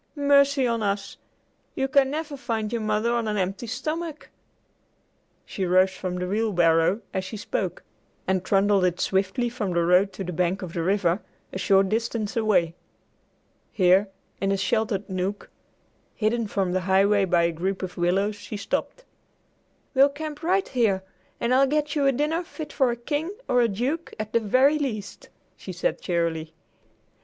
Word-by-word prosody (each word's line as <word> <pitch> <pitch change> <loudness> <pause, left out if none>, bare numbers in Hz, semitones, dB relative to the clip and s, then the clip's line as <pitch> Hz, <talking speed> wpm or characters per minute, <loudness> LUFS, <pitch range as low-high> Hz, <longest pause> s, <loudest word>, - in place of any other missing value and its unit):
Mercy 280 -1 +4
on 230 -2 0
us! 200 -1 -2 0.6
You 270 - 0
can 270 0 +3
never 300 0 -4
find 230 -5 -3
your 235 - -1
mother 215 +2 0
on 235 -2 0
an 210 -1 -1
empty 195 +4 -2
stomach!" 310 +6 -4 1.1
She 195 - -4
rose 185 +1 +4
from 185 -1 -5
the 180 0 -3
wheelbarrow, 180 -2 +2
as 190 - -1
she 190 +3 -6
spoke, - - -3 0.4
and 190 -1 +1
trundled 195 0 +3
it 180 -1 +1
swiftly 195 +5 0
from 230 -6 -3
the 170 -1 +2
road 180 +3 +4
to 195 - -5
the 180 -1 -5
bank 180 +3 0
of 175 -2 -7
the 170 - -2
river, 185 +1 +1 0.3
a 190 - -4
short 195 0 +3
distance 225 0 -2
away. 210 -7 +2 1.0
Here, 190 +1 +4 0.3
in 195 0 +1
a 195 - +1
sheltered 205 0 0
nook, 190 +2 -4 0.6
hidden 225 +1 0
from 195 -3 -1
the 185 +1 0
highway 200 +1 +4
by 175 -2 +2
a 170 - +2
group 190 +4 -3
of 185 - -5
willows, 190 +4 +1
she 210 +1 -7
stopped. 220 - -3 0.9
"We'll 275 +1 +6
camp 295 +1 -7
right 375 +4 +1
here, 215 -7 +1 0.4
and 235 +1 +1
I'll 270 +1 +5
get 300 +1 0
you 285 -2 +2
a - - +5
dinner 300 +6 0
fit 310 -3 -8
for 265 -3 +2
a 235 - -1
king 295 - -3
or 250 - +3
a 235 - +4
duke, 255 +11 -3
at 215 0 -5
the 230 - +4
very 260 +8 +3
least," 215 -8 -5 0.3
she - - -8
said - - -2
cheerily. 165 -2 -2
210 Hz, 170 wpm, -25 LUFS, 190-260 Hz, 1.1 s, We'll